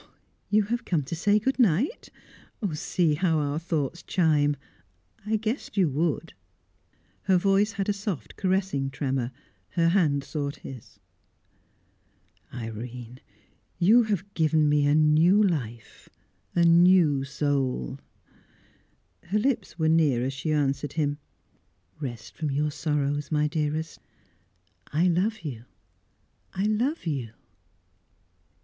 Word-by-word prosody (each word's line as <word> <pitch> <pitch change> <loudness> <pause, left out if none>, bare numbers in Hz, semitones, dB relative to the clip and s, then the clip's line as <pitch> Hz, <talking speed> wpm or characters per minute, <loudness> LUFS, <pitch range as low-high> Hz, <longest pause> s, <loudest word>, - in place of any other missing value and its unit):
"You 210 0 +4
have 235 +4 -2
come 165 -5 0
to 135 - -5
say 205 +5 +3
good 265 +6 -1
night? 230 - +1 0.6
See 155 +1 +1
how 165 +1 +1
our 145 0 -1
thoughts 165 -1 -2
chime; 150 -5 +2 0.7
I 220 - +1
guessed 220 +2 -3
you 180 -7 +3
would." 155 +2 -1 0.9
Her 190 -2 +4
voice 195 +3 +2
had 195 -1 -2
a 205 - +2
soft, 195 - -5
caressing 185 -8 0
tremor; 130 -2 -2 0.4
her 165 -1 +3
hand 155 -7 +2
sought 145 -1 -4
his. 130 -5 -11 1.5
"Irene! 120 +1 -7 0.6
You 210 +8 +6
have 205 -3 -2
given 155 -1 +2
me 145 -1 +3
a 145 - +4
new 155 +7 +5
life, 120 - -3 0.5
a 175 - +4
new 170 -4 +5
soul!" 135 - -1 1.3
Her 190 +5 0
lips 255 -2 -1
were 160 -2 +1
near 155 -7 +3
as 135 - -2
she 135 +4 -3
answered 140 -1 0
him. 145 -2 -1 0.8
"Rest 120 -7 -7
from 155 - -2
your 150 +2 0
sorrows, 145 -1 -1
my 150 -1 +2
dearest. 155 +1 -2 0.9
I 165 +5 +2
love 195 +5 +1
you! 125 -8 -7 0.9
I 190 - -2
love 230 - 0
you!" 130 -9 -3
155 Hz, 120 wpm, -26 LUFS, 140-190 Hz, 1.5 s, You